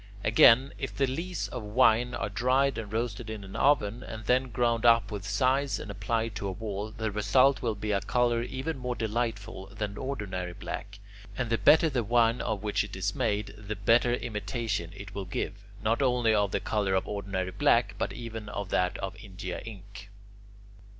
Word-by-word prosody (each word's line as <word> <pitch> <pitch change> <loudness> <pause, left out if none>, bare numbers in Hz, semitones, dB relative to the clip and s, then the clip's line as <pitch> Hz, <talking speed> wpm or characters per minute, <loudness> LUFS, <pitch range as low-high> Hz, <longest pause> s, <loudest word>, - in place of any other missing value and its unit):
Again, 115 +4 +6
if 135 - -5
the 140 - +3
lees 165 +8 -3
of 125 - -5
wine 120 +2 +3
are 110 - -2
dried 130 +6 +1
and 105 -2 -7
roasted 115 0 -3
in 110 -2 -6
an 95 0 -10
oven, 125 -5 +2
and 110 -2 -8
then 130 +2 +2
ground 115 0 +1
up 115 -3 +5
with 100 -3 -4
size 130 +7 +1
and 100 - -6
applied 110 +3 -1
to 100 - -3
a - - -2
wall, 105 +1 -4
the 110 0 -3
result 105 +7 +3
will 115 -3 -1
be 105 +1 -3
a 100 -1 +1
colour 120 +3 +1
even 135 +4 -4
more 125 -1 -3
delightful 110 -3 -3
than 105 0 -5
ordinary 95 -9 -4
black; 100 +3 -6 0.4
and 120 -2 -2
the 115 - +3
better 160 - +6
the 130 -6 0
wine 115 +1 +3
of 105 -2 -2
which 105 -1 +1
it - - -8
is - - -1
made, 100 0 -1
the 105 +1 -6
better 115 +4 +3
imitation 105 -4 -3
it 100 0 -9
will 100 -1 -4
give, 90 - -3 0.3
not 115 +4 +1
only 125 -4 +3
of 105 -2 +2
the 100 - 0
colour 100 -2 0
of 95 - 0
ordinary 100 -2 -3
black, - - +3
but - - -1
even 115 0 -7
of 100 -2 -5
that 90 +1 +1
of 95 +2 -5
India 95 -4 -6
ink. 105 -1 -10
110 Hz, 190 wpm, -29 LUFS, 100-120 Hz, 0.4 s, Again